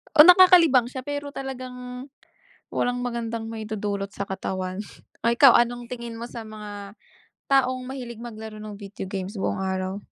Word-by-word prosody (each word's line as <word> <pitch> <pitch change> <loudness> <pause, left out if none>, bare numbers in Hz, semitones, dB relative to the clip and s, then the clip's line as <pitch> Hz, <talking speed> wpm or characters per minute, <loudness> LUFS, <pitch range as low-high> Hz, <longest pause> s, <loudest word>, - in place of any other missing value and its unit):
Oo, 300 - +11
nakakalibang 350 -8 +7
siya 260 +1 -6
pero 285 0 -4
talagang, 255 -1 -7 0.7
walang 245 0 0
magandang 230 -2 -3
maidudulot 210 -3 -3
sa 200 - -3
katawan. 185 0 -3 0.5
O 235 - +4
ikaw, 250 +2 +7
anong 240 0 0
tingin 235 -2 -6
mo 230 - -5
sa 230 - -6
mga 205 -1 -9 0.5
taong 255 -2 +3
mahilig 245 -3 -7
maglaro 220 -2 -8
ng 210 -1 -8
video 200 -1 -7
games 190 +1 -4
buong 190 - -1
araw. 190 0 -2
235 Hz, 150 wpm, -25 LUFS, 205-255 Hz, 0.7 s, Oo